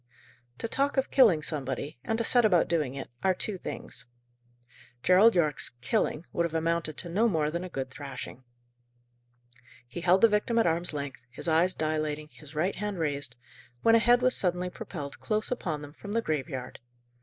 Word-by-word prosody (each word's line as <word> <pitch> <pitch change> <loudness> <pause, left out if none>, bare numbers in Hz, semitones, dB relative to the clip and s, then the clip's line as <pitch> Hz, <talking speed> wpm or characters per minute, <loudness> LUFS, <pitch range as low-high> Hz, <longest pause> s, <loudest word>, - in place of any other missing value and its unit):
To 230 - -3
talk 275 +4 0
of 265 - +1
killing 205 - +5
somebody, 140 -2 -3
and 225 - -1
to 230 - 0
set 245 +1 +3
about 185 -6 +4
doing 150 -6 0
it, 135 - -7
are 190 -1 +2
two 210 +2 -3
things. - - -7 1.0
Gerald 195 +5 +6
Yorke's 155 -5 +2
"killing" 140 +5 -1
would 170 - +1
have 165 -1 -3
amounted 165 -1 -1
to 175 - -2
no 210 +7 +2
more 155 -5 0
than 170 +2 -3
a 185 - -6
good 135 -5 -5
thrashing. 135 -2 -8 1.4
He 150 +8 -7
held 185 +2 +4
the 230 - +8
victim 215 +2 0
at 230 - +4
arm's 170 +1 +2
length, 140 -4 -5
his 125 - -5
eyes 165 +3 +3
dilating, 155 -1 -2
his 150 0 -14
right 175 +6 0
hand 205 0 -3
raised, 145 -6 -1 0.5
when 225 - +5
a 230 - +7
head 240 +2 +4
was 255 0 +4
suddenly 180 0 +1
propelled 160 -11 -7
close 215 +1 -1
upon 160 -11 -3
them 145 0 -10
from 205 +5 -8
the 230 - +2
graveyard. 140 -4 -3
170 Hz, 185 wpm, -28 LUFS, 150-210 Hz, 1.4 s, the